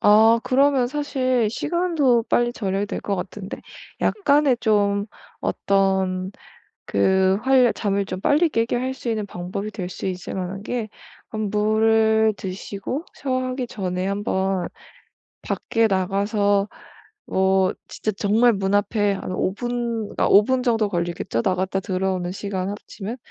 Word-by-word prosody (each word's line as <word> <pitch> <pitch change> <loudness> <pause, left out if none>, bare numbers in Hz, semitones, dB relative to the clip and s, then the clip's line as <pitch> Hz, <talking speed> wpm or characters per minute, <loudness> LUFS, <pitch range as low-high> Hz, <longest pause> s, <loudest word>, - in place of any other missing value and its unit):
아 220 +2 +6
그러면 270 -1 +3
사실 255 -5 0
시간도 295 -6 +1
빨리 240 0 +2
절약이 200 -2 -2
될 - - -4
것 200 -1 -1
같은데 190 +2 -6 0.4
약간의 290 - +3
좀 205 -2 +2 0.3
어떤 190 -1 0 0.6
그 190 - +3
활 260 -3 +4
잠을 200 -1 -1
좀 185 -1 -5
빨리 315 +3 +3
깨게 230 -3 0
할 260 +1 -2
수 250 -2 -5
있는 215 -2 -1
방법이 195 +3 -5
될 185 -3 -5
수 185 - -7
있을 180 -1 -5
만한 190 +1 -4
게 230 -1 -3 0.4
막 215 -1 -4
물을 220 +1 +3
드시고 200 - -5
샤워하기 255 -2 -2
전에 185 -3 -3
한번 195 -2 -1 0.7
밖에 225 -1 0
나가서 200 +1 +1 0.6
뭐 190 0 +2
진짜 215 - -3
정말 220 +4 +3
문 195 0 -1
앞에 205 0 +1
한 190 - -5
5 185 +1 0
분 235 0 -2
그러니까 - - 0
5 205 +1 +7
분 260 +2 0
정도 225 -4 +2
걸리겠죠? 175 +2 -2
나갔다 190 0 0
들어오는 185 -1 -1
시간 195 -1 -3
합치면. 205 +3 -7
205 Hz, 255 characters per minute, -23 LUFS, 190-240 Hz, 0.7 s, 5